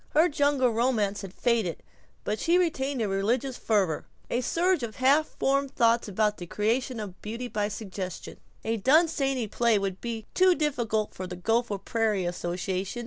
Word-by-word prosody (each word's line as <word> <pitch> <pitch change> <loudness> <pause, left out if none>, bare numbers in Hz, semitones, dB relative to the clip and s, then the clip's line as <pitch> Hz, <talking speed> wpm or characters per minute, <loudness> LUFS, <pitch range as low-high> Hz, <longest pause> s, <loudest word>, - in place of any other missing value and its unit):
Her 320 +3 +6
jungle 285 -4 +2
romance 220 -4 +1
had 195 -3 -7
faded, 225 -5 0 0.4
but 210 0 -2
she 340 +2 +3
retained 280 -8 0
a - - 0
religious 230 +7 0
fervor, 195 -11 0 0.2
a 240 - +1
surge 350 +5 +1
of 230 -2 -5
half 280 +4 +4
formed 275 0 0
thought 230 0 +3
about 210 +1 +1
the 175 - -8
creation 230 +5 -1
of 200 -4 -7
beauty 230 +4 -5
by 210 -3 -1
suggestion. 195 -4 -6 0.3
A 225 +1 0
Dunsany 270 - +2
play 230 +1 +2
would 195 -2 -3
be 230 -2 -4
too 370 -1 +5
difficult 235 -9 -1
for 185 - -6
the 180 - -6
Gopher 225 +3 0
Prairie 210 -1 0
association. 180 +4 -3
230 Hz, 165 wpm, -27 LUFS, 200-265 Hz, 0.4 s, Her